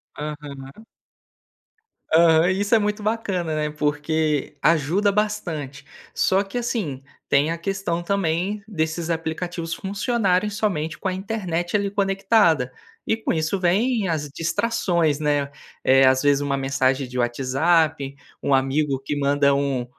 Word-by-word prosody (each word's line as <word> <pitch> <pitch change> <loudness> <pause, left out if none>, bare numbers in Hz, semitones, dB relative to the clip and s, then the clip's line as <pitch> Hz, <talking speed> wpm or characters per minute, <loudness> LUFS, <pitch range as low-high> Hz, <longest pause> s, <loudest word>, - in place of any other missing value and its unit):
Aham. 145 +3 -8 1.3
Aham, 165 +1 +5
isso 200 +4 0
é 225 - +6
muito 210 0 -2
bacana, 195 -7 -1
né, 150 0 -1
porque 150 0 -1
ajuda 165 +6 +2
bastante. 170 -10 -3 0.3
Só 190 +1 +3
que 200 +4 -6
assim, 195 - -3 0.2
tem 145 +3 +3
a 170 - -2
questão 175 -1 -2
também 195 +2 -1
desses 160 -4 -2
aplicativos 165 +1 -3
funcionarem 200 -1 0
somente 185 -7 -2
com 190 - -2
a - - -2
internet 185 -3 -3
ali 200 -1 0
conectada. 195 - +2 0.3
E 225 - +1
com 220 - -1
isso 160 +4 -1
vem 210 +5 +1
as 150 -4 -2
distrações, 170 -2 0
né. 145 -2 0 0.3
Eh. 135 0 +5
Às 130 0 +4
vezes 145 -1 +3
uma 140 -1 0
mensagem 135 0 0
de 125 - -4
WhatsApp, 140 +4 +1 0.3
um 140 - +1
amigo 135 +1 +1
que 145 - -3
manda 140 0 +3
um 140 -3 0
165 Hz, 135 wpm, -23 LUFS, 145-195 Hz, 1.3 s, é